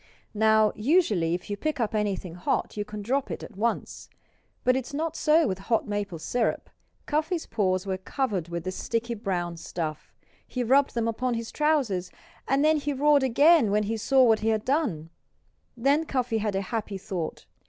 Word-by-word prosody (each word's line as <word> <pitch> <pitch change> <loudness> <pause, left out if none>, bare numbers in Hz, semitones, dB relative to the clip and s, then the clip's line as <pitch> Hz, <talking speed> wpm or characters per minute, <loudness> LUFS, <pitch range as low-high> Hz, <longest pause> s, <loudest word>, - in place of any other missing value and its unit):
Now, 220 0 +4
usually 210 - +2
if 180 - -7
you 205 - -2
pick 305 +8 -3
up 225 -1 -1
anything 200 -5 -2
hot 175 - -2
you 210 - -2
can 210 0 -7
drop 265 +5 0
it - - -5
at - - -10
once. 230 +4 -2 0.5
But 255 - +3
it 260 -2 -2
is - - -7
not 320 +1 -2
so 310 0 +3
with 190 0 -2
hot 225 -1 +2
maple 205 -4 -3
syrup. 230 +9 -1 0.3
Cuffy's 315 +3 -1
paws 185 -2 0
were 190 -1 -2
covered 195 - -2
with 170 -1 -4
the 185 - -3
sticky 230 +4 -2
brown 180 -6 -3
stuff. 160 -2 -5 0.4
He 250 - -2
rubbed 270 +3 +3
them 230 -1 0
upon 245 +2 -1
his 230 0 -5
trousers, 265 - +1 0.4
and 275 +2 +2
he 300 -2 +2
roared 290 +1 +4
again 280 0 +5
when 210 +1 +2
he 220 +2 -2
saw 260 +4 +3
what 225 -3 +4
he 220 - 0
had 220 -1 0
done. 215 - -1 0.7
Then 280 +6 +2
Cuffy 250 -5 0
had 210 -2 -1
a 195 - +1
happy 210 -1 -4
thought. 185 -5 -5
225 Hz, 185 wpm, -27 LUFS, 195-270 Hz, 0.7 s, again